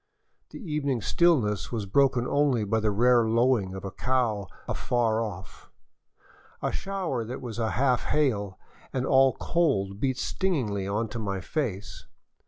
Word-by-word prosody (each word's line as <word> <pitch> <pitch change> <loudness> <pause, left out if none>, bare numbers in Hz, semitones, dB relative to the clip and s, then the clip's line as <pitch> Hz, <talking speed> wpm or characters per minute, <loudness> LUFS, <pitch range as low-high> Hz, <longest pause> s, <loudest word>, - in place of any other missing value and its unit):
The - - -10
evening 150 - -2
stillness 115 - +2
was 110 -4 -2
broken 130 +3 +2
only 140 -6 +2
by 110 +2 0
the 110 -1 +1
rare 120 +3 +4
lowing 115 -4 +2
of 95 - -7
a 95 - -4
cow 115 -5 0 0.2
afar 115 -2 0
off; 95 -4 -7 0.9
a - - -1
shower 185 -11 -3
that 120 +3 -6
was 120 -3 -7
half 125 +3 +1
hail 105 -10 0 0.3
and 130 -1 -1
all 135 -1 +5
cold 100 - 0
beat 130 0 0
stingingly 125 - -1
into 110 +3 -2
my 100 -3 -2
face. 110 - -4
120 Hz, 140 wpm, -27 LUFS, 105-135 Hz, 0.9 s, all